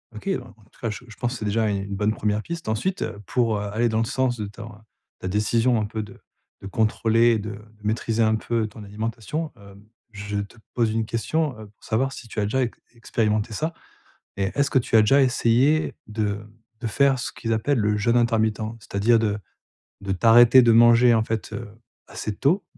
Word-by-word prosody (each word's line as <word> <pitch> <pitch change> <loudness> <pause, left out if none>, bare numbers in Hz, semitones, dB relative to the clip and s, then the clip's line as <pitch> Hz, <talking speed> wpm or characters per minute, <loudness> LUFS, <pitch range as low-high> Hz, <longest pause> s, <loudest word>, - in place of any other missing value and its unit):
OK. 110 - -9
En 185 -11 -1
en 110 -2 -20
tout - - -25
cas, 115 - -1
je 105 +3 -7
je 115 - -12
pense 120 +1 -2
c'est 105 - -5
déjà 110 +2 +1
une 100 -1 -1
une 100 0 -5
bonne 105 +2 +1
1re 105 0 -1
piste 165 -2 -6
ensuite, 120 - -1
heu, 100 - -5
pour, 115 0 +1
heu, 105 0 -4
aller 115 +2 +2
dans 110 0 0
le 115 - +1
sens 130 -1 0
de 105 - -2
ton, 105 +2 -10 0.5
ta - - -5
décision 115 +5 +2
un 105 - -1
peu 110 +1 -4
de 105 - -13 0.4
de 100 - -7
contrôler 115 +3 +2
et 110 - +1
de 105 +1 -5
de 105 +1 -14
maîtriser 115 +1 0
un 110 0 +3
peu 115 0 -1
ton 110 0 -11
alimentation, 115 - -4
hem, 100 -1 -15 0.3
je 105 0 -5
te 100 +3 -7 0.2
pose 115 -3 +1
une 110 0 -1
question, 130 +4 -1
heu, 110 - -10
pour 105 - -26
savoir 130 +5 0
si 120 - -10
tu 110 - -5
as 105 - +1
déjà 130 +6 0
ex 120 - -4 0.2
expérimenté 110 -1 -1
ça, 160 +9 -2 0.6
et 100 - 0
est-ce 140 0 +1
que - - +4
tu 120 -2 +1
as - - +8
déjà 135 +6 +5
essayé 130 +4 +2
de 105 -2 -2 0.4
de 125 - -3
faire 135 +4 +2
ce 120 - -3
qu'ils 115 - -3
appellent 120 +5 +1
le 105 -1 +1
jeûne 115 +3 +2
intermittent, 115 -2 +2 0.2
c'est-à-dire 105 +2 +2
de 105 -2 0 0.6
de 100 -1 -2
t'arrêter 120 +5 +7
de 115 - +5
manger 120 +1 +6
en 110 - +3
fait, 110 -1 -4
heu, 115 -3 -6 0.4
assez 100 +2 -5
tôt, 170 - +1
110 Hz, 220 wpm, -24 LUFS, 105-120 Hz, 0.6 s, as